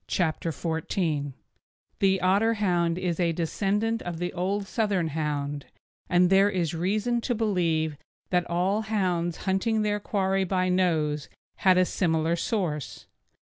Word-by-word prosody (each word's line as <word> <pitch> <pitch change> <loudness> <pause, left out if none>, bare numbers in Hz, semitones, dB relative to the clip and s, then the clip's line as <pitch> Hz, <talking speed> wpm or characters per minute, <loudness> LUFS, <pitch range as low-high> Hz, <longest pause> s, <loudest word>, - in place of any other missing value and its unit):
CHAPTER 165 -1 0
XIV 160 +1 -3
THE - - 0
OTTERHOUND 145 -6 -1 0.6
The 195 -1 +3
Otterhound 185 -3 +2
is 180 -2 -2
a 170 -2 +2
descendant 205 +7 -1
of 175 -2 -5
the 175 +1 -3
old 195 +3 -1
Southern 195 -6 0
Hound, 145 -2 -3 0.4
and 180 0 +4
there 195 +1 +5
is 175 -5 -1
reason 210 +8 0
to 245 +1 -1
believe 165 -8 0 0.3
that 180 -1 +1
all 185 +5 +1
hounds 180 -6 -1
hunting 210 +3 +1
their 210 0 0
quarry 195 -2 0
by 185 0 0
nose 160 -5 +1 0.3
had 185 -2 +4
a 185 - +5
similar 165 -2 +1
source. 170 - -3
180 Hz, 140 wpm, -26 LUFS, 165-200 Hz, 0.6 s, there